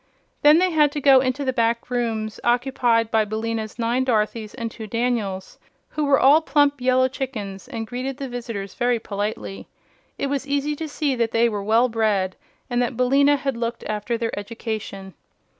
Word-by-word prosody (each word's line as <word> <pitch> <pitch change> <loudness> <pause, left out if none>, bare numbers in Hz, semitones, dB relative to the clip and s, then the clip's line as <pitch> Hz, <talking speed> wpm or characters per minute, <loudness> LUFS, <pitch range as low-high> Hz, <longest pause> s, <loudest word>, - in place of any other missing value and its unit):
Then 300 +2 +7
they 365 +1 +3
had 300 -3 +4
to 295 - -2
go 275 -2 +6
into 260 +2 -1
the 260 - 0
back 235 +1 0
rooms 225 -3 -2
occupied 240 -2 +2
by 220 -1 +3
Billina's 220 +1 -4
nine 240 +2 +1
Dorothys 220 -3 -1
and 230 -2 -4
two 220 -1 -8
Daniels, 220 -5 -2 0.3
who 305 -1 -2
were 280 -1 +4
all 290 +4 +6
plump 290 -2 +2
yellow 255 0 +3
chickens 235 -7 -6
and 230 -4 -5
greeted 255 +3 -4
the 275 -2 -5
visitors 230 -6 -6
very 245 0 +1
politely. 205 -2 -5 0.5
It - - -2
was 275 0 -2
easy 285 +1 0
to 320 - -4
see 290 -1 -1
that 230 -1 +1
they 230 +1 +3
were 210 -3 -2
well 225 +5 +3
bred 210 -5 0 0.3
and 245 -1 0
that 245 -1 -2
Billina 275 +3 +4
had 275 -2 -2
looked 235 0 -3
after 215 +2 -2
their 230 0 -2
education. 205 -3 -6
240 Hz, 180 wpm, -23 LUFS, 220-270 Hz, 0.5 s, Then